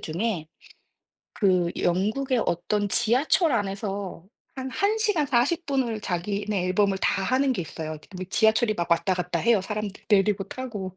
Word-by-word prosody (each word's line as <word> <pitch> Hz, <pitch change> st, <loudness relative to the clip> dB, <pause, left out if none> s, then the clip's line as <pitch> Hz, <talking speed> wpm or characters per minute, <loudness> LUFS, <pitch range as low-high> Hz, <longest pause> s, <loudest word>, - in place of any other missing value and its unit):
중에 170 Hz, 0 st, -2 dB, 0.9 s
그 185 Hz, -4 st, +2 dB
영국의 220 Hz, +8 st, +1 dB
어떤 205 Hz, +4 st, 0 dB
지하철 255 Hz, -, +3 dB
안에서 200 Hz, -4 st, -3 dB, 0.3 s
한 265 Hz, -1 st, -5 dB
1 405 Hz, +9 st, 0 dB
시간 420 Hz, -9 st, +2 dB
40 275 Hz, +8 st, +1 dB
분을 260 Hz, -6 st, -1 dB
자기네 200 Hz, +1 st, -2 dB
앨범을 195 Hz, +1 st, +1 dB
다 195 Hz, -, 0 dB
하는 260 Hz, +6 st, +2 dB
게 180 Hz, -, -2 dB
있어요. 160 Hz, 0 st, -6 dB, 0.2 s
뭐 185 Hz, -, -5 dB
이 185 Hz, -, -6 dB
지하철이 220 Hz, +2 st, +3 dB
막 170 Hz, -3 st, -3 dB
왔다 170 Hz, +3 st, +2 dB
갔다 180 Hz, -1 st, -2 dB
해요 230 Hz, +3 st, +3 dB
사람들 210 Hz, 0 st, -5 dB
내리고 200 Hz, -1 st, +3 dB
타고. 205 Hz, -5 st, -6 dB
205 Hz, 290 characters per minute, -25 LUFS, 185-245 Hz, 0.9 s, 지하철